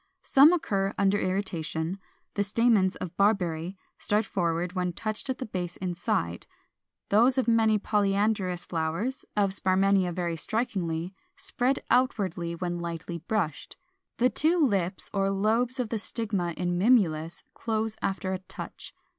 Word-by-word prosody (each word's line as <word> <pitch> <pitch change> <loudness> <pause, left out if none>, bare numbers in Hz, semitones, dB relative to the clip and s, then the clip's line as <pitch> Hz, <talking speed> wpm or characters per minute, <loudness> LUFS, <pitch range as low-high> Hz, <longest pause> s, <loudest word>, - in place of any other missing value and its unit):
Some 280 +4 +7
occur 195 - 0
under 200 +1 +3
irritation: 185 -2 -2 0.3
the 205 - +1
stamens 205 -2 +3
of 170 - -6
Barberry 185 -3 +1 0.2
start 210 +1 +1
forward 175 -2 -1
when 180 -2 -1
touched 215 +8 -4
at 260 - -1
the 255 - -4
base 180 -5 -4
inside: 175 - -2 0.6
those 240 +6 +4
of 260 - +1
many 225 -2 +4
polyandrous 200 -3 0
flowers 170 +11 -2
(of 200 -2 +3
Sparmannia 190 -1 +3
very 170 -1 -2
strikingly) 180 -4 -2 0.2
spread 255 +3 0
outwardly 190 -9 +1
when 175 0 -3
lightly 170 0 -5
brushed: 175 -3 -3 0.4
the 250 +1 +3
two 325 +4 +2
lips 195 - +1
or 195 -1 +1
lobes 225 +6 +1
of 245 -3 -1
the 225 - -1
stigma 200 -6 -2
in 175 0 -1
Mimulus 175 -8 +2
close 220 -1 -2
after 190 -1 -1
a 185 - -2
touch. 185 - -9
195 Hz, 140 wpm, -28 LUFS, 175-220 Hz, 0.6 s, Some